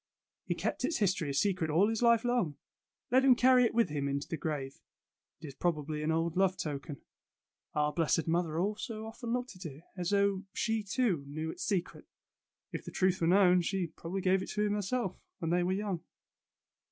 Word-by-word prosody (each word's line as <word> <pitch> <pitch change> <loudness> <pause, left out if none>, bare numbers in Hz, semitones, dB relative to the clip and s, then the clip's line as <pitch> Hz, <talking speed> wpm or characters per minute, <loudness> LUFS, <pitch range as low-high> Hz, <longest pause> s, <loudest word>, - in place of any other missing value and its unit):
He - - 0
kept - - -2
its 335 - +1
history 185 -7 +1
a - - -2
secret 185 -1 +1
all 170 +7 +4
his 225 +1 -1
life 235 -1 +4
long. 235 - 0 0.5
Let 260 +1 +5
him 265 -2 +7
carry 250 0 +5
it - - 0
with 230 -6 +3
him 145 -2 -2
into 140 +1 -2
the - - -3
grave. 140 -3 -4 0.6
It 160 - -10
is 140 - -7
probably 155 -1 -1
an 155 - -1
old 165 0 0
love 190 0 +2
token. 145 -4 -5 0.7
Our 150 0 +1
blessed 165 0 +1
mother 165 -1 0
also 215 +3 -3
often 230 +1 -6
looked 250 -2 -2
at 185 - -10
it, 145 +2 -11
as 180 -2 -2
though 200 -1 +2
she, 225 -1 0
too, 205 - 0
knew 155 +3 -4
its - - -7
secret. 185 -4 -2 0.6
If - - -5
the - - -7
truth 185 -1 +1
were 165 - +3
known, 180 0 +5
she 175 -2 -2
probably 185 +4 -4
gave 185 +1 +3
it - - -6
to 210 0 +1
him 205 - +1
herself, 205 -1 -2 0.2
when 165 -3 -2
they 175 +1 +3
were 180 +1 0
young." 190 -3 -2
185 Hz, 200 wpm, -32 LUFS, 160-210 Hz, 0.7 s, him